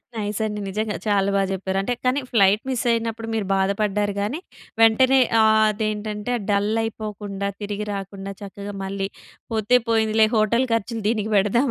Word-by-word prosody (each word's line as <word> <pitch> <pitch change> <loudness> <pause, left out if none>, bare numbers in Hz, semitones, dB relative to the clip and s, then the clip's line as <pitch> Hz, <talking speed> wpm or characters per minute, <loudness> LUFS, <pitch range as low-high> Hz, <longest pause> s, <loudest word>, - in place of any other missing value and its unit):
Nice 210 -2 -3
అండి 210 -1 -3
నిజంగా 210 +2 -2
చాలా 200 -1 +2
బాగా 195 0 +2
జెప్పారు. 190 0 -2
అంటే 220 +5 -1
కానీ 255 +3 +2
ఫ్లైట్ 205 -1 +4
మిస్ 255 -3 -1
అయినప్పుడు 230 -1 -2
మీరు 220 -2 -1
బాధపడ్డారు 200 +1 0
గానీ, 225 +10 -2 0.4
వెంటనే 255 +4 +5 0.2
ఆహ్, 220 0 +5
అదేంటంటే 215 +1 -3 0.2
డల్ 205 +1 +2
అయిపోకుండా, 210 -3 -4
తిరిగి 205 0 -3
రాకుండా 195 0 -6
చక్కగా 200 0 -7
మళ్ళీ 195 0 -3 0.4
పోతే 220 +2 +3
పోయిందిలే 220 -1 +3
హోటల్ 225 +4 +3
ఖర్చులు 225 0 -2
దీనికి 220 -1 0
బెడదాం 210 +7 +3
210 Hz, 150 wpm, -23 LUFS, 200-225 Hz, 0.4 s, వెంటనే